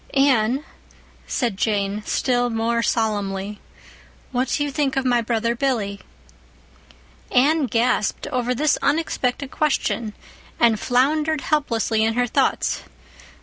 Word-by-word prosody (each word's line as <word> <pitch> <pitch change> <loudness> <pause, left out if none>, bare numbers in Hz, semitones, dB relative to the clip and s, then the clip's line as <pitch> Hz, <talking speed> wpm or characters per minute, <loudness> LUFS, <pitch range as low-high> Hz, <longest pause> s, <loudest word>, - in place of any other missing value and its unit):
"Anne," 270 0 +3 0.6
said 235 -5 -1
Jane, 205 -1 0
still 245 -1 +1
more 230 +1 0
solemnly, 205 -3 -1 0.7
"what 255 +1 0
do 290 - 0
you 290 - -2
think 275 -2 0
of 265 - 0
my 245 -2 +3
brother 230 0 0
Billy?" 230 -6 -1 1.3
Anne 285 +3 +3
gasped 230 -1 0
over 250 0 0
this 300 +4 +2
unexpected 280 -4 0
question, 235 -7 0 0.5
and 230 -3 +4
floundered 300 +6 +1
helplessly 230 -7 +1
in 225 0 +1
her 245 0 +2
thoughts. 240 - 0
245 Hz, 115 wpm, -22 LUFS, 225-270 Hz, 1.3 s, and